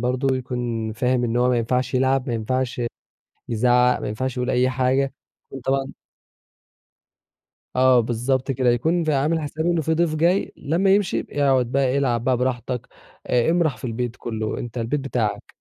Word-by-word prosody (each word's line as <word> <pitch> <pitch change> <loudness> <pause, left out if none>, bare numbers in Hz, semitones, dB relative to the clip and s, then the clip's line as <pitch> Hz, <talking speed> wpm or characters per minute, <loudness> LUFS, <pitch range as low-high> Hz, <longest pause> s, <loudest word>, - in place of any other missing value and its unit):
برضه 130 +2 0
يكون 120 -3 -3
فاهم 125 +2 +1
إن 115 0 -1
هو 125 +1 +3
ما 125 -1 +2
ينفعش 125 +3 -1
يلعب، 130 +1 +2
ما 120 - -1
ينفعش 125 +3 -2 0.7
يزعّق، 125 +2 +3
ما - - -4
ينفعش 130 +5 -3
يقول 125 0 -1
أي 125 0 +2
حاجة، 130 +1 +1 0.4
يكون 135 - -7
طبعًا 135 +1 -1 1.8
آه 130 -1 +5
بالضبط 125 +4 0
كده، 130 -1 +1
يكون 160 +9 +1
في 155 -1 +1
عامِل 150 +4 +1
حسابه 160 +3 -1
إن 170 -1 +1
في 160 +2 0
ضيف 165 -1 +1
جاي، 170 +5 +1
لمّا 170 +7 +1
يمشي 200 -3 0
يبقى - - -6
يقعُد 135 -4 +2
بقى 135 -1 +1
يلعب 125 -5 +1
بقى 130 0 +2
براحتك 125 -1 -2 0.4
آآ، 125 +4 +2
امرَح 165 -6 +1
في - - -7
البيت 120 0 -3
كلّه، 110 -2 -3
أنت 120 0 -6
البيت 120 +5 -1
بتاعك. 125 -6 -3
130 Hz, 175 wpm, -23 LUFS, 120-140 Hz, 1.8 s, آه